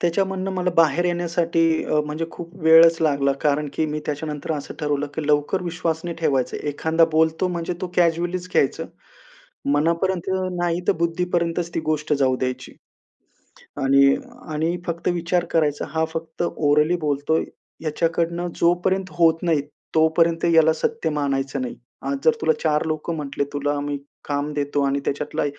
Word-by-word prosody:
त्याच्यामधनं 190 +2 0
मला 180 -1 0
बाहेर 165 +1 +4
येण्यासाठी 170 -1 0 0.2
अ, 150 - +1
म्हणजे 155 +2 -3
खूप 170 0 -9
वेळच 165 +1 +7
लागला, 140 -3 +2
कारण 150 0 +1
की 160 - 0
मी 150 0 -3
त्याच्यानंतर, 150 +1 -3
असं 145 -2 -5
ठरवलं 145 -1 0
की 155 -2 -3
लवकर 150 +5 +1
विश्वास 170 -2 -2
नाही 170 -1 -4
ठेवायचं. 135 -5 +1
एखांदा 160 +3 +2
बोलतो 160 +3 +2
म्हणजे 170 0 -3
तो 185 - -2
कॅज्युअलीच 175 +1 +1
घ्यायचं, 135 - +1 0.9
मनापर्यंत 170 +5 +1 0.3
नाहीतर, 175 0 +1
बुद्धीपर्यंतच 170 0 0
ती - - 0
गोष्ट 155 -1 -1
जाऊ 130 -3 +2
द्यायची. 130 0 -4 1.1
आणि 140 0 +5 0.4
आणि 160 +3 0
फक्त 170 0 -2
विचार 175 +1 0
करायचा, 150 -3 +1
हा 160 +2 0
फक्त 160 +1 -4
ओरली 150 +3 +3
बोलतो 145 +2 0
आहे, - - 0 0.4
ह्याच्याकडनं 165 +2 -1
जोपर्यंत 185 +2 +1
होत 165 0 +4
नाही, 165 -4 +2 0.3
तोपर्यंत 165 +1 +3
याला 160 0 +6
सत्य 165 +1 -1
मानायचं 140 -2 -1
नाही. 125 - -4 0.3
आज 280 - 0
जर 475 - +6
तुला - - +3
चार 150 +1 +2
लोकं 155 +2 -2
म्हंटले, 140 -2 -2
तुला 145 0 -1
आम्ही 145 0 -3 0.3
काम 145 +1 -2
देतो 145 0 0
आणि 140 +1 0
त्याच्यातला 150 +2 -2
160 Hz, 150 wpm, -22 LUFS, 145-170 Hz, 1.1 s, वेळच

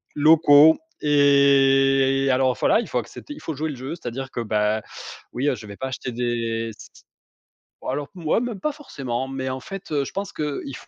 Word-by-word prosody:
locaux 155 0 +6 0.3
et 135 -1 +4
alors 130 0 +2
voilà, - - +3
il - - -4
faut - - -1
accepter, 295 - -9
il 295 - -12
faut 160 - -5
jouer 155 +3 -3
le - - -7
jeu, 130 +6 -6
c'est-à-dire 135 -2 -6
que, - - -5
bah, 105 -1 0 0.5
oui, 130 +4 -1
heu, - - 0
je 110 -2 -11
vais 100 - -9
pas 130 - -4
acheter 130 -1 -5
des 115 -1 -2
s - - -14 0.9
bon, - - -9
alors, 140 +2 -3
moi, 170 +5 0
même 240 -5 -4
pas 300 +7 -2
forcément, 135 - -5
mais 130 -1 -4
en 130 0 -5
fait, 195 +7 -8
heu, 140 -1 +1
je - - -8
pense 200 0 -4
qu'il 145 -2 -4
135 Hz, 200 wpm, -23 LUFS, 125-150 Hz, 0.9 s, locaux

